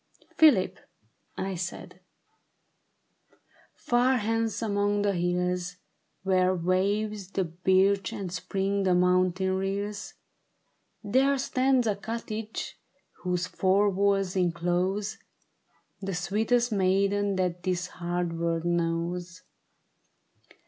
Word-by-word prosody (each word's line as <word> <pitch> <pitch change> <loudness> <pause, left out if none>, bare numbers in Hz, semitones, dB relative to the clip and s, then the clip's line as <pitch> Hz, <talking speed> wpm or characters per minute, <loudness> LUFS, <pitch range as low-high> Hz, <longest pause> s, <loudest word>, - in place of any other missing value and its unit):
" - - -29
Philip," 295 - +5 0.6
I 190 +1 -2
said, 180 0 -6 0.7
" - - -47 1.0
far 250 +2 +2
hence 225 0 -1
among 205 -1 +1
the 200 -1 +2
hills, 180 0 -1 0.5
^Miere 185 -1 +2
waves 200 +3 0
the 195 -1 -1
birch 190 +4 +2
and 200 -5 -5
spring 195 +2 -1
the 185 -2 +2
mountain 185 +1 +2
rills, 200 +2 -3 0.9
There 265 +6 +3
stands 260 -1 +2
a 210 -2 +1
cottage 220 +1 -5 0.4
whose 180 0 -1
four 195 +2 +2
walls 195 -1 +1
inclose. 180 +3 0 0.8
The 195 -1 -3
sweetest 225 +6 +1
maiden 200 +1 +1
that 180 -2 -1
this 180 -1 -1
hard 175 -1 -3
worid 165 0 -1
knows. 170 +1 -2
190 Hz, 100 wpm, -27 LUFS, 180-205 Hz, 1.0 s, Philip